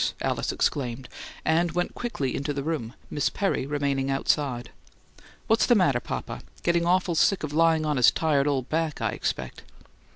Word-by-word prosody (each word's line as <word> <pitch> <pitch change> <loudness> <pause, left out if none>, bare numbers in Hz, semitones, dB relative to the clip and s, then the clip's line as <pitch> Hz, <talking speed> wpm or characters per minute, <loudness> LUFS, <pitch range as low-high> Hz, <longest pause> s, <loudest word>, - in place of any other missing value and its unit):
Alice - - 0
exclaimed, 125 -2 -1 0.4
and 165 +1 +2
went 175 0 -1
quickly 190 - -3
into 145 +1 -2
the 140 -1 -3
room, 135 -7 -3 0.2
Miss 145 - +1
Perry 195 -9 -1
remaining 140 -2 -1
outside. 135 -2 0 0.7
"What's 225 +1 +3
the 240 - +5
matter, 145 - +3
papa? - - -5 0.2
Getting 170 0 +2
awful 180 0 +2
sick 180 +3 +2
of 150 -1 -4
lying 160 0 +3
on 150 -2 0
his 125 - +7
tired 150 -3 +1
old 135 -3 0
back, 160 -1 -1
I - - 0
expect." - - -4
150 Hz, 165 wpm, -26 LUFS, 135-170 Hz, 0.7 s, his